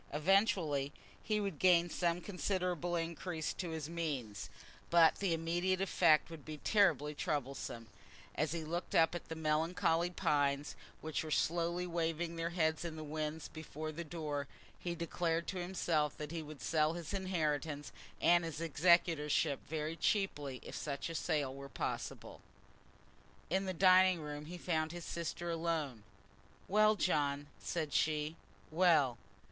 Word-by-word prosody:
Eventually 160 - +2 0.3
he 215 -1 +1
would 195 -7 -3
gain 175 -2 +5
some 175 0 0
considerable 180 -3 -1
increase 165 0 -2
to 180 - -4
his 160 -2 -4
means, 140 - -3 0.4
but 170 -1 +6
the 195 -3 0
immediate 175 +3 +1
effect 165 -5 +4
would 160 -3 -9
be 155 -1 -7
terribly 170 -5 +3
troublesome. 140 -5 -3 0.5
As 155 -1 0
he 165 -1 -2
looked 170 +3 -3
up 165 +1 +5
at 175 - -6
the 160 - -4
melancholy 160 +2 +1
pines 145 -4 +1 0.3
which 160 0 -2
were 155 - -6
slowly 170 +3 +1
waving 170 -1 -1
their 165 0 -2
heads 160 -2 +1
in 165 -2 -4
the 155 - -6
wind 155 0 -3
before 155 0 -6
the 165 +2 -5
door 150 -3 -4 0.3
he 175 -1 -3
declared 170 0 -1
to 190 - -3
himself 165 -5 0
that 150 0 -6
he 165 -1 -3
would 155 -2 -9
sell 155 -1 +2
his 170 0 -6
inheritance 155 -6 -1 0.3
and 175 0 +5
his 165 -2 -4
executorship 165 -2 +3
very 155 +1 -2
cheaply, 150 - 0
if - - -9
such 140 +1 -3
a - - -5
sale 150 -5 0
were 140 0 -9
possible. - - -4 1.1
In 190 +2 +1
the 190 - -1
dining 185 0 +6
room 150 -1 -6
he 175 +3 -7
found 160 -2 -1
his 175 -1 -7
sister 170 0 -3
alone. 160 -8 -1 0.7
"Well, 215 +2 +5
John," 145 -7 +1 0.2
said 155 -4 -2
she; 155 0 +1 0.4
"well? 155 -8 +4
165 Hz, 150 wpm, -35 LUFS, 150-175 Hz, 1.1 s, but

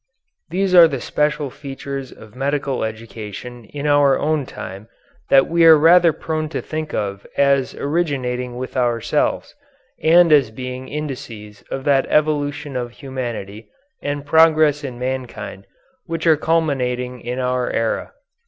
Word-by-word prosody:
These 185 +2 0
are 175 -2 +9
the 140 -4 -4
special 150 +1 -1
features 135 -1 -7
of 110 +1 -15
medical 140 0 -1
education 110 +1 -7
in 140 +6 -7
our 145 -2 +4
own 150 -3 -1
time 100 +3 -8 0.4
that 135 0 +5
we 170 0 +2
are 160 -1 +9
rather 170 +2 +6
prone 155 0 -3
to - - -3
think 155 0 -5
of 100 -1 -4
as 140 -1 +2
originating 130 -6 -2
with 130 +1 -6
ourselves 120 -3 0 0.5
and 170 +1 +5
as 140 -6 +5
being 125 +3 -7
indices 120 -9 -7
of 135 - -4
that 135 -1 +2
evolution 145 -1 0
of 120 -1 -4
humanity 120 -5 -6 0.3
and 145 0 -3
progress 155 -1 +4
in 130 -4 -6
mankind 125 -6 -5 0.4
which 165 -1 -4
are 160 -1 +6
culminating 125 -6 -1
in 125 +1 -4
our 125 -1 -1
era. 115 - -1
135 Hz, 140 wpm, -20 LUFS, 125-150 Hz, 0.5 s, are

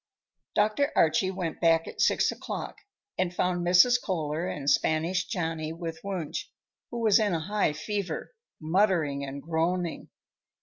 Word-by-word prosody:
Dr. 215 +7 +2
Archie 165 +4 +3
went 180 -4 -4
back 165 -1 +3
at - - -5
six - - +3
o'clock, - - -6 0.4
and 185 -1 +1
found 180 -1 0
Mrs. 185 +8 +5
Kohler 160 -2 -2
and 140 -5 -5
Spanish 160 +5 +2
Johnny 160 -5 -3
with 165 -1 -6
Wunsch, 185 -6 -4 0.4
who 235 - -4
was 220 -2 +5
in 205 -5 +1
a - - 0
high 195 -1 0
fever, 195 - -4 0.3
muttering 160 -4 +1
and 140 0 -6
groaning. 170 +1 -1
175 Hz, 140 wpm, -28 LUFS, 160-195 Hz, 0.4 s, Mrs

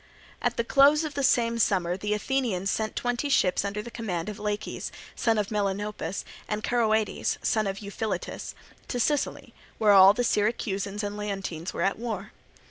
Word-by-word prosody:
At - - 0
the 235 - +2
close 280 +5 +5
of 305 -2 -4
the 280 - -2
same 235 -3 +3
summer 180 -5 +2
the 210 +2 -1
Athenians 210 -5 0
sent 215 -1 -2
twenty 245 +4 -1
ships 190 -10 +3
under 205 +1 -3
the 235 - -9
command 195 -6 -3
of 210 0 -7
Laches, 210 0 -3 0.2
son 225 -2 +2
of 210 -1 0
Melanopus, 205 -3 -2 0.2
and 210 0 -3
Charoeades, 220 -3 +1
son 215 -2 +1
of 195 +2 -4
Euphiletus, 200 -2 -4 0.3
to 245 - -2
Sicily, 290 +4 -1 0.2
where 210 -2 +5 0.2
the 245 - 0
Syracusans 205 -2 0
and 205 0 -3
Leontines 195 -5 -4
were - - -2
at 195 +2 0
war. 215 -3 -4
210 Hz, 165 wpm, -27 LUFS, 200-235 Hz, 0.3 s, close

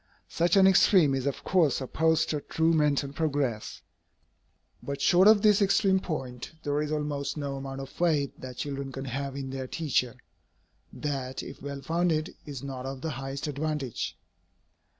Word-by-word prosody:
Such 170 +3 +2
an 195 -1 +7
extreme 190 -5 +5
is 135 0 -1
of 140 - -3
course 175 -6 +2
opposed 160 +4 +1
to 150 -2 -2
true 160 +3 +1
mental 145 -3 +1
progress. 140 -8 -2 1.0
But 140 0 -5
short 180 +7 +5
of 215 -1 +6
this 210 -1 +5
extreme 195 -1 +3
point, 130 -9 -5
there 145 +1 0
is 150 0 -3
almost 145 -1 -2
no 140 -2 -3
amount 135 0 -6
of 135 - -7
faith 150 -5 +1
that 125 -1 -8
children 140 -1 -4
can 135 0 -6
have 135 +1 -4
in 135 -1 -5
their 130 -1 -4
teacher, 130 -5 0 0.8
that, 135 -3 -4
if 135 - -10
well 140 -1 -6
founded, 165 0 0
is 140 -3 -6
not 135 -2 -5
of 135 -1 -6
the 160 - -3
highest 135 +1 -5
advantage. 150 -3 -3
140 Hz, 165 wpm, -28 LUFS, 135-160 Hz, 1.0 s, an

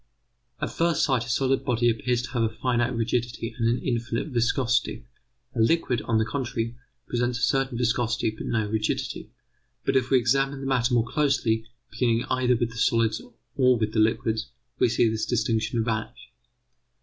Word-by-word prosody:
At - - -3
first 170 0 +1
sight 130 -4 +1
a - - -7
solid 135 +2 +1
body 120 -2 +1
appears 120 +1 +1
to - - -7
have 120 -2 0
a 115 - +2
finite 120 +1 0
rigidity 115 0 -2
and 115 0 +2
an 120 - +2
infinite 120 +2 -1
viscosity; 120 - 0 0.5
a - - -4
liquid, 125 -1 +2
on 115 - +1
the 110 - +2
contrary, 120 -3 -3 0.3
presents 120 0 0
a 125 - -4
certain 135 -3 +1
viscosity, 120 -2 0
but 110 - -7
no 110 -3 0
rigidity. 110 0 -2 0.6
But - - +1
if 130 -1 +2
we 135 - +5
examine 135 +3 +1
the 135 - -6
matter 125 -2 +2
more 115 -1 +3
closely, 115 -5 +1 0.2
beginning 115 -1 +1
either 125 -1 +3
with 115 0 -1
the 115 - -10
solids 115 0 +2 0.3
or 130 -2 +4
with 110 -1 -1
the 110 - +1
liquids, 110 +1 +1 0.3
we 125 - +4
see 120 0 +3
this 110 0 -1
distinction 115 -1 0
vanish. 115 +2 -4
120 Hz, 175 wpm, -26 LUFS, 115-125 Hz, 0.6 s, we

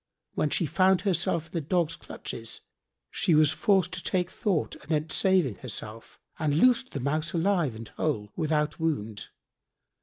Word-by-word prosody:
When 150 - 0
she 170 - +1
found 185 +4 +3
herself 175 -4 +1
in 160 - -20
the 165 - -2
dog's 165 +1 0
clutches, - - -6 0.5
she 175 -6 +2
was 155 -1 +5
forced 190 -1 +2
to 180 - -4
take 180 +1 0
thought 200 -8 -1
anent 155 0 -1
saving 185 - +2
herself 110 +1 -8 0.2
and 150 -3 +1
loosed 250 +8 +3
the 140 - -3
Mouse 150 +5 -1
alive 170 - +1
and 110 0 -8
whole 105 -10 -2
without 155 -2 0
wound. 110 -10 -2
160 Hz, 155 wpm, -27 LUFS, 145-180 Hz, 0.5 s, was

